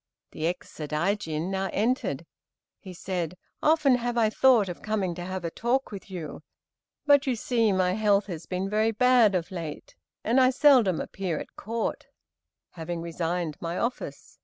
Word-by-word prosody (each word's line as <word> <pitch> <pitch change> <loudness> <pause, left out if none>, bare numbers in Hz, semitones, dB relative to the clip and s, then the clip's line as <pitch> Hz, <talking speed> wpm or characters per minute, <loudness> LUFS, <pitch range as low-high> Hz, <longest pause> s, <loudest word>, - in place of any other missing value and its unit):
The 155 - -2
ex 180 +1 -4
Sadaijin 160 +2 -2
now 195 0 -1
entered. 240 +6 -1 0.5
He 190 - -10
said, 180 -1 -4 0.2
"Often 300 -5 +4
have 240 0 -2
I 220 -2 +3
thought 240 -5 +4
of 175 - -6
coming 205 -5 -1
to 175 - -7
have 185 -1 -5
a 165 - -2
talk 245 +6 -1
with 200 -1 -9
you, 175 -5 -7 0.6
but 285 -1 +5
you 255 - +2
see 230 -1 +1
my 185 -1 +2
health 205 -1 +2
has 170 -5 -7
been 185 +1 -2
very 215 +2 +2
bad 230 -2 +4
of 180 +2 -2
late, 170 - -6 0.3
and 250 +3 +3
I 255 - +6
seldom 255 - +5
appear 185 -5 -3
at - - -8
Court, 230 +2 -3 0.6
having 165 0 -5
resigned 170 -1 -2
my 170 +1 -3
office. 245 +1 -4
195 Hz, 165 wpm, -27 LUFS, 175-235 Hz, 0.6 s, I